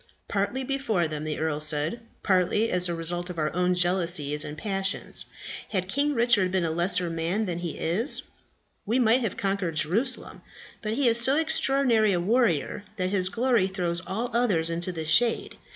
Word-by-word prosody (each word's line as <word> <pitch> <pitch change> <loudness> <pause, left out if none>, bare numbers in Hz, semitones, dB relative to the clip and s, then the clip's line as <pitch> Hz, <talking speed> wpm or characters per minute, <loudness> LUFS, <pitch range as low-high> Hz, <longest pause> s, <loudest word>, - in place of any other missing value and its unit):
"Partly 205 +7 -2
before 255 - -1
them," 155 0 -5
the 155 -1 -3
earl 155 -1 -1
said, 155 +7 -2 0.2
"partly 190 +3 +1
as 180 0 +1
the 170 - -2
result 175 +2 -3
of 180 - -7
our 155 -1 -1
own 180 0 +1
jealousies 170 -5 0
and 150 0 -7
passions. 195 0 -3 0.4
Had 185 -3 -2
King 285 +8 0
Richard 230 -6 +3
been 185 -2 0
a 160 - -1
lesser 175 +2 +2
man 165 +6 -2
than 175 -3 -3
he 170 -2 -5
is, 210 - +2 0.6
we 225 +5 0
might 245 0 +3
have 225 -6 -3
conquered 195 -4 -2
Jerusalem. 200 - 0 0.4
But 215 -1 -3
he 280 -1 +1
is 235 0 +7
so 265 +4 +6
extraordinary 270 -9 +2
a 175 - +1
warrior 205 - 0
that 185 -2 -2
his 185 -2 +1
glory 235 -2 +1
throws 180 -3 -2
all 230 +6 -3
others 195 -9 +1
into 170 +2 -3
the 160 -3 -5
shade. 225 +9 +1
185 Hz, 180 wpm, -26 LUFS, 170-230 Hz, 0.6 s, is